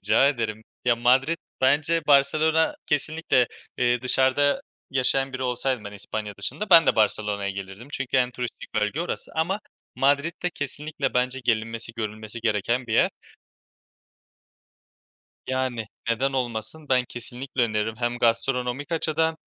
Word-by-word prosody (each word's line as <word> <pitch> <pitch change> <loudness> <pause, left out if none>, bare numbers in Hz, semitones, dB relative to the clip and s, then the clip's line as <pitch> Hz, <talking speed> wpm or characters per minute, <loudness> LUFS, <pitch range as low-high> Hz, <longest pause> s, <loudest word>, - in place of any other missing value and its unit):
Rica 110 +7 +4
ederim. 110 -5 -2 0.2
Ya, 120 -1 +4
Madrid 130 +7 +3 0.2
bence, 150 +5 +3
Barcelona 155 +3 +4
kesinlikle, 150 -4 +2 0.3
eee, 120 0 +2
dışarıda 130 +2 +3 0.3
yaşayan 135 0 +2
biri 130 - -4
olsaydım; 125 -1 -1
ben 100 - -7
İspanya 105 +1 -5
dışında, 210 -1 -2
ben 165 -2 +9
de - - +3
Barcelona'ya 105 -2 +1
gelirdim. 100 +5 -8
Çünkü 135 -1 -1
en 125 -1 +3
turistik 125 -1 -7
bölge 105 +9 0
orası. 175 - -4
Ama 175 +6 0 0.3
Madrid 140 +4 +2
de 180 - 0
kesinlikle 150 +1 -3
bence 125 +1 +1
gelinmesi, 115 0 -1
görülmesi 110 +1 -5
gereken 115 +3 0
bir 110 - -4
yer. - - +4 2.4
Yani 130 -4 -2 0.2
neden 135 +4 +1
olmasın? 125 +4 -3
Ben 125 -1 +3
kesinlikle 125 +2 -3
öneririm. 110 -1 0
Hem 120 0 -2
gastronomik 125 +5 0
açıdan 160 0 +1
125 Hz, 130 wpm, -25 LUFS, 115-145 Hz, 2.4 s, ben